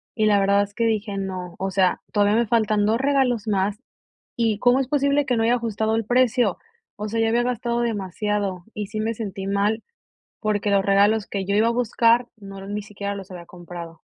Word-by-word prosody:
y 215 - +1
la 205 -1 +4
verdad 200 +1 +3
es 205 0 -9
que 230 +2 0
dije 215 -2 -1
no, 185 -2 -5
o 195 - -1
sea, 185 -1 +2
todavía 205 0 +3
me 235 - +1
faltan 215 -2 +2
2 225 - +2
regalos 265 -5 +1
más 200 0 0 0.6
y 225 -3 +1
cómo 245 +1 +4
es 270 - -1
posible 280 0 +2
que 250 - +1
no 225 - +1
haya 235 +2 +3
ajustado 220 -1 -1
el 225 - -1
precio. 245 -2 +2 0.4
O 210 - -2
sea, 225 +2 -2
ya 225 - +2
había 235 +1 +2
gastado 240 -1 -1
demasiado 205 -3 -2
y 210 -2 -4
sí 215 +1 -4
me 225 +1 -1
sentí 195 -3 -5
mal, 205 +3 0 0.6
porque 210 -1 0
los 195 -1 +3
regalos 205 +2 +3
que 195 -1 -3
yo 200 +1 0
iba 215 +2 +4
a - - +2
buscar 235 0 +2
no 195 -1 -10
ni 205 +1 -4
siquiera 200 0 -5
los 195 -1 -9
había 175 -1 -9
comprado. 175 -2 -10
210 Hz, 210 wpm, -23 LUFS, 200-230 Hz, 0.6 s, la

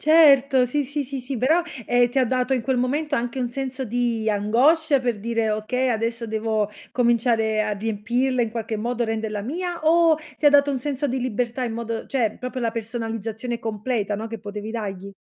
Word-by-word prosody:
Certo, 280 -5 +6
sì, 290 +3 -1
sì, 285 +2 -3
sì, 270 0 -5
sì, 255 +2 -4
però, 315 +9 +3 0.2
ehm, 245 0 +4
ti 255 - -1
ha 260 - +4
dato 255 +1 0
in 250 - -1
quel 260 +1 0
momento 285 +4 0
anche 240 +1 -2
un 245 -2 0
senso 265 +1 -4
di 235 -1 -1
angoscia, 270 +9 +3
per 240 -4 -1
dire: 230 0 0
"Okay, 220 +5 0
adesso 230 0 -1
devo 220 -1 -1 0.2
cominciare 230 -3 +2
a 210 -1 -1
riempirla 235 +5 0
in 230 - -2
qualche 225 -1 -3
modo, 240 +2 -1
renderla 220 -2 -3
mia", 345 - -3
o 330 0 +5 0.2
ti 300 - +2
ha 290 - +8
dato 285 0 +5
un 270 - -1
senso 285 +2 -2
di 260 +1 -1
libertà 245 +1 -2
in 230 - -3
modo 230 -1 -4
cioè, 230 -6 0
proprio 255 +1 -5
la 230 -2 0
personalizzazione 225 +1 -4
completa, 215 -1 -2
no, 220 +2 -4
che 225 0 -6
potevi 210 +1 -6
dagli? 200 -4 -5
240 Hz, 195 wpm, -23 LUFS, 220-265 Hz, 0.2 s, ha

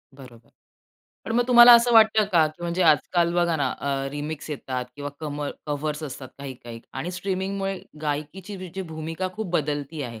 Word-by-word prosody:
बरोबर. 120 -4 -15 0.8
पण 225 - -4
मग 245 - +4
तुम्हाला 240 0 +10
असं 235 +1 +5
वाटतं 220 -1 +6
का, 160 -2 +5
की 155 +3 -10
म्हणजे 175 +2 -1
आजकाल 170 +2 +3
बघा 170 -2 +2
ना 145 - 0
अ, 135 -1 -2
रिमिक्स 145 +1 -5
येतात 130 -3 -4
किंवा 145 0 -5
कम 150 -1 -4 0.2
कव्हर्स 150 +1 -3
असतात 135 -3 -7
काही-काही 120 -4 -8
आणि 150 +7 -4
स्ट्रीमिंगमुळे 195 +1 -3 0.2
गायकीची 155 +7 -4
जी 190 +3 -6
भूमिका 165 +2 -4
खूप 215 -4 -5
बदलती 150 -1 -2
आहे, 115 -4 -7
155 Hz, 165 wpm, -24 LUFS, 145-185 Hz, 0.8 s, तुम्हाला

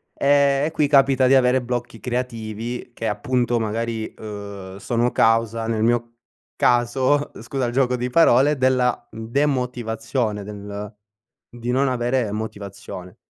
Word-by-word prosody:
Ehm, 140 0 +3
e 155 - -2
qui 150 -2 +1
capita 135 -2 +4
di 135 - +5
avere 130 0 +4
blocchi 120 -1 -4
creativi 120 -1 -4
che 115 - -4
appunto 120 +3 0
magari, 115 0 -3
ehm, 100 -3 -8
sono 120 +4 0
causa 115 0 +2
nel 110 -1 0
mio 120 0 +1 0.4
caso, 130 +4 +2
scusa 130 +3 -2
il 120 - -3
gioco 125 -1 +2
di 125 0 -2
parole, 145 -1 +4
della, 125 -2 +1
mhmm, 115 0 -7
demotivazione 120 -5 -1
del 105 +1 -7 0.6
di 120 0 -6
non 135 +2 +2
avere 120 -3 0
motivazione. 100 -4 -7
120 Hz, 135 wpm, -22 LUFS, 110-130 Hz, 0.6 s, di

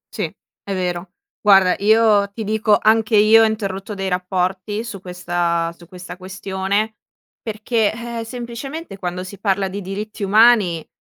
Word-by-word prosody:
Sì - - -1 0.4
è 200 - -3
vero. 180 -1 -3 0.3
Guarda 195 -3 +6
io 210 -1 +4
ti 220 +1 -5
dico, 215 0 +2
anche 220 +1 +3
io 220 +2 +7
ho - - +6
interrotto 205 -2 -3
dei 195 -1 -3
rapporti 185 +3 -2
su 210 -5 -8
questa 175 -2 -1
su 170 -1 -17
questa 180 0 -10
questione, 195 +3 -2 0.4
perché, 220 0 0
ehm, 235 +1 -6
semplicemente 245 - -7
quando 180 0 -4
si 190 +1 -10
parla 195 -1 0
di 200 +2 -5
diritti 205 +3 -6
umani, 205 -5 +4
200 Hz, 145 wpm, -20 LUFS, 185-220 Hz, 0.4 s, io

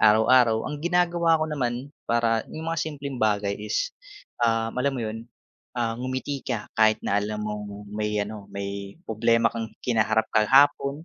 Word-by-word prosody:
araw-araw. 110 +1 +5
Ang 150 -1 -5
ginagawa 175 -1 +2
ko 155 - 0
naman 135 -2 -3 0.2
para 115 -1 +2
yung 160 +1 -4
mga 165 - -1
simpleng 140 -4 -5
bagay 105 -2 +1
is, 105 0 -1 0.5
ah, 115 -1 +1
alam 135 +2 0
mo 120 - -2
yun, 115 +2 -6 0.5
ah 115 -2 0
ngumiti 130 +3 -3
ka 115 -5 -3
kahit 110 0 +4
na 100 +1 +2
alam 105 +1 -3
mong 105 -1 -6
may 105 0 -2
ano, 105 0 -4
may 100 0 -6
problema 115 - +2
kang 115 -1 -4 0.2
kinaharap 110 -2 +2
kahapon, 140 +6 +4
115 Hz, 160 wpm, -25 LUFS, 105-140 Hz, 0.5 s, araw-araw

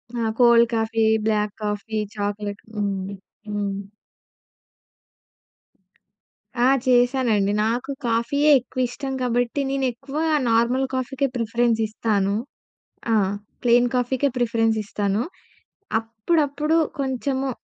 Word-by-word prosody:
ఆ! - - -2 0.2
Cold 235 -1 +6
coffee, 225 0 +1 0.2
black 210 -1 +1
coffee, 210 +1 -3 0.2
chocolate 205 0 -3
హ్మ్, 200 -2 -1 0.5
హ్మ్. 205 -1 -2 2.9
ఆ! - - +6 0.2
చేశానండి. 245 -5 +3
నాకు 245 +5 -1 0.2
కాఫీయే 260 +6 +2
ఎక్కువ 255 +1 -8
ఇష్టం 270 +1 -5
కాబట్టి, 245 +2 0
నేను 270 -1 0
ఎక్కువ 270 +4 -8 0.3
నార్మల్ 240 +4 +2
కాఫీకే 270 +2 -1
ప్రిఫరెన్స్ 230 0 +1
ఇస్తాను. 205 -2 0 0.8
ఆ - - +5 0.5
ప్లెయిన్ 245 0 +5
కాఫీకే 260 +3 +1
ప్రిఫరెన్స్ 225 -2 +1
ఇస్తాను. 205 +2 -1 0.8
అప్పుడప్పుడు 290 +7 0 0.2
కొంచెము 265 0 -1
235 Hz, 95 wpm, -23 LUFS, 215-265 Hz, 2.9 s, Cold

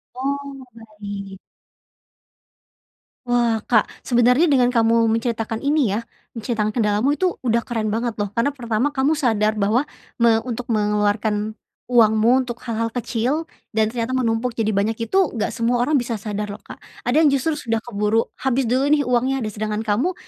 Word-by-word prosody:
Oh, 275 +1 -4
baik. 205 -3 -8 1.9
Wah, 240 -3 +1
Kak, 220 -4 +3 0.2
sebenernya 250 +5 +4
dengan 260 -6 +3
kamu 230 -1 +3
menceritakan 225 -1 -1
ini 280 -8 +2
ya - - -2 0.4
menceritakan 215 -2 -1
kendalamu 215 +2 +1
itu 370 -1 +1
udah 235 -2 0
keren 225 -3 -2
banget 230 +2 -1
loh. 205 - -2
Karena 255 +5 +1
pertama 245 +1 -1
kamu 285 +3 +1
sadar 220 -5 +1
bahwa 210 +4 +2 0.4
me 230 -1 +5
untuk 245 0 -5
mengeluarkan 210 0 0 0.3
uangmu 230 +2 +4
untuk 240 -1 -7
hal-hal 230 0 -1
kecil 250 +6 -2 0.2
dan 220 -1 +2
ternyata 230 +1 -3
menumpuk 245 -1 0
jadi 225 -2 -1
banyak 220 +3 -1
itu 380 - 0 0.2
nggak - - 0
semua 235 +1 +1
orang 295 +5 +1
bisa 240 -2 -2
sadar 210 0 -4
loh, 205 - -8
Kak. - - -11 0.3
Ada 300 +6 +4
yang 300 - +6
justru 280 +3 0
sudah 230 -5 -1
keburu 215 0 0 0.2
habis 265 -1 +1
dulu 255 +4 +2
nih 300 -1 +4
uangnya, 255 +2 +1
de 215 - -2
sedangkan 215 +1 -3
kamu 245 - +1
230 Hz, 160 wpm, -21 LUFS, 215-255 Hz, 1.9 s, yang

